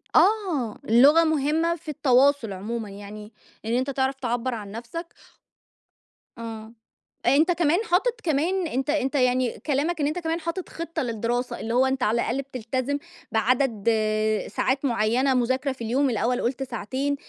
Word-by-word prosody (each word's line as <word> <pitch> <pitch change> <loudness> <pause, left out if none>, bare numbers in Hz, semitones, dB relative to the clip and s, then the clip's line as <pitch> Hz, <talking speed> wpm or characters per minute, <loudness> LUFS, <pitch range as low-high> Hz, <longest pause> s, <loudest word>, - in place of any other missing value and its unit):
آه. 360 - +2
اللغة 285 +8 +7
مهمة 315 +2 +1
في 315 -1 -11
التواصل 275 -5 +3
عمومًا، 215 +3 -5
يعني 210 +2 -10 0.3
إن 230 - -1
أنت 260 +3 0
تعرف 265 0 0
تعبَّر 245 0 -1
عن 205 -3 -6
نفْسك 245 +10 -6 1.3
آه. 225 -1 -7 0.5
أنت 300 +8 +4
كمان 340 +1 +2
حاطط 445 +5 +2
كمان 335 +4 +1
أنت 270 +1 -2
أنت 290 -2 0
يعني 250 -1 +1
كلامك 305 +3 0
إن 285 - +2
أنت 325 +4 -2
كمان 330 0 -2
حاطط 335 +2 -4
خطة 335 0 -4
للدراسة، 240 +2 -2
اللي 230 +1 -3
هو 255 +2 +4
أنت 265 -1 0
على 235 +1 +2
الأقل 265 +4 -1
بتلتزم 260 +1 -3 0.3
بعدد 230 -1 +1 0.6
ساعات 270 +2 -1
معيّنة 240 +3 +2
مذاكرة 260 +2 +1
في 255 -3 -7
اليوم، 260 +5 +1
الأول 240 +2 0
قُلت 255 +2 -1
ساعتين 260 +4 -2
260 Hz, 150 wpm, -25 LUFS, 235-300 Hz, 1.3 s, اللغة